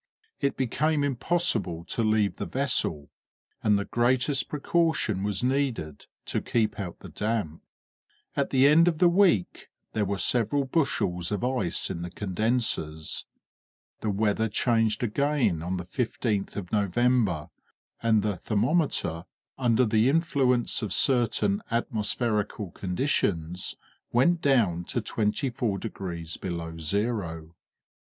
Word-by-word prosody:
It 140 - 0
became 145 +4 +1
impossible 140 - 0
to 115 - -2
leave 105 -3 +1
the - - -4
vessel, 120 - 0 0.5
and 105 -2 +3
the 100 - -2
greatest 130 +4 +1
precaution 150 - 0
was 100 0 -1
needed 125 - -1 0.2
to - - -1
keep 110 -2 0
out 90 -4 -6
the - - -9
damp. 105 -8 -2 0.7
At 140 - 0
the 130 0 +4
end 165 +4 +6
of 165 -3 +2
the 180 - +5
week 175 - +2 0.3
there 110 - +1
were 100 0 -2
several 125 +7 +2
bushels 95 - 0
of 105 +1 -2
ice 125 -9 +1
in 85 - -5
the 90 - -5
condensers. 95 -5 -1 0.7
The 110 - -2
weather 105 +2 +1
changed 115 0 +1
again 120 - +1
on 90 +3 -2
the 90 - -5
15th 110 -1 -2
of 95 -4 -6
November, 105 -5 +1 0.5
and 110 -3 +3
the 105 -3 -1
thermometer, 110 - 0 0.3
under 125 -1 +3
the 110 +2 +3
influence 135 -7 +1
of 105 -5 -2
certain 135 - +2
atmospherical 110 -3 -1
conditions, 90 - -1 0.4
went 165 +8 +3
down 110 - +2
to - - -2
24 110 0 -1
degrees 85 -6 -5
below 85 -3 -5
zero. 85 -3 -2
110 Hz, 125 wpm, -27 LUFS, 95-130 Hz, 0.7 s, end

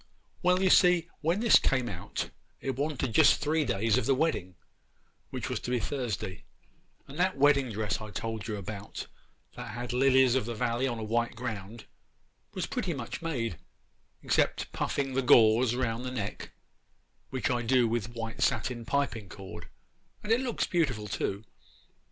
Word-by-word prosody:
Well, 180 +1 +3
you 190 - +4
see, 180 -2 +5
when 170 +6 0
this 230 -2 +7
came 130 -3 +1
out, 90 -7 -5 0.3
it 135 - -3
wanted 135 -3 -2
just - - +6
three 155 +1 +1
days 105 -3 +1
of - - -3
the 135 - +4
wedding, 130 - -1 0.7
which - - -4
was - - -2
to - - -6
be 125 -1 +1
Thursday; 110 -10 -3 0.6
and 140 +4 -9
that 185 -3 +2
wedding 140 -3 +4
dress 105 -1 -2
I 110 - -7
told 110 0 -4
you 110 - -2
about, 100 0 -6 0.5
that 105 - -7
had 120 0 -4
lilies 130 -1 +5
of 130 -4 +1
the 120 - -3
valley 120 +2 0
on 120 -3 -2
a 110 - -5
white 115 +2 0
ground, 110 -2 -6 0.7
was - - -1
pretty - - -2
much - - -6
made, 120 - -2 0.6
except - - +1
puffing 135 -2 -2
the 135 - +1
gauze 120 -2 +5
round 120 -2 -1
the 130 - -3
neck, 125 -6 -5 0.8
which 130 -1 -1
I 120 -1 0
do 120 +1 +3
with 115 0 -2
white 115 0 -5
satin 120 -2 0
piping 115 -7 -1
cord, 95 +1 -9 0.5
and 210 - -3
it 235 +3 +4
looks 245 -3 -1
beautiful 130 -12 0
too. 100 0 -2
120 Hz, 170 wpm, -29 LUFS, 110-140 Hz, 0.8 s, this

